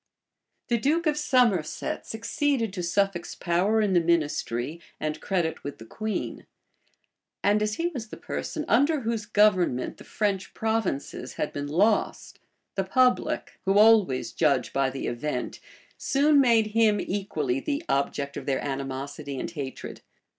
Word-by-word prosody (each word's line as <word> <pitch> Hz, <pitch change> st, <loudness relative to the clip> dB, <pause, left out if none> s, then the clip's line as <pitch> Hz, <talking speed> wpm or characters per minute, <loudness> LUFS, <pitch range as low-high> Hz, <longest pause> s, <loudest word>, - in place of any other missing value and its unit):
The 235 Hz, -1 st, +2 dB
duke 315 Hz, +8 st, +1 dB
of 305 Hz, -1 st, +2 dB
Somerset 245 Hz, -, +1 dB
succeeded 230 Hz, 0 st, -1 dB
to 185 Hz, -, -3 dB
Suffolk's 175 Hz, 0 st, 0 dB
power 190 Hz, +6 st, +1 dB
in 205 Hz, -3 st, +1 dB
the 175 Hz, -, +5 dB
ministry, 155 Hz, -3 st, -1 dB, 0.2 s
and 155 Hz, 0 st, -3 dB
credit 175 Hz, -4 st, -1 dB
with 145 Hz, -, -6 dB
the 110 Hz, -, -11 dB
queen; 215 Hz, -, -4 dB, 1.0 s
and 205 Hz, +1 st, +3 dB
as 215 Hz, 0 st, 0 dB
he 330 Hz, -, -2 dB
was 250 Hz, -10 st, -6 dB
the -, -, -9 dB
person 305 Hz, -2 st, -4 dB
under 285 Hz, +5 st, +3 dB
whose 225 Hz, -2 st, -2 dB
government 185 Hz, -, +2 dB
the -, -, -12 dB
French 200 Hz, -3 st, -2 dB
provinces 220 Hz, -10 st, -2 dB
had 150 Hz, -, -3 dB
been 145 Hz, 0 st, -4 dB
lost, 205 Hz, +9 st, +1 dB, 0.3 s
the 195 Hz, -, 0 dB
public, 250 Hz, +6 st, +1 dB
who 195 Hz, +1 st, +3 dB
always 210 Hz, -11 st, +5 dB
judge 140 Hz, -8 st, +1 dB
by 135 Hz, -1 st, +2 dB
the 135 Hz, +1 st, -5 dB
event, 125 Hz, +2 st, -3 dB, 0.4 s
soon 285 Hz, +1 st, +4 dB
made 230 Hz, -4 st, +4 dB
him 220 Hz, -2 st, +4 dB
equally 155 Hz, -10 st, -2 dB
the 290 Hz, -, -2 dB
object 140 Hz, 0 st, -1 dB
of -, -, -7 dB
their 135 Hz, -1 st, +1 dB
animosity 135 Hz, 0 st, -4 dB
and -, -, -4 dB
hatred. 140 Hz, -5 st, -7 dB
195 Hz, 145 wpm, -26 LUFS, 145-225 Hz, 1.0 s, the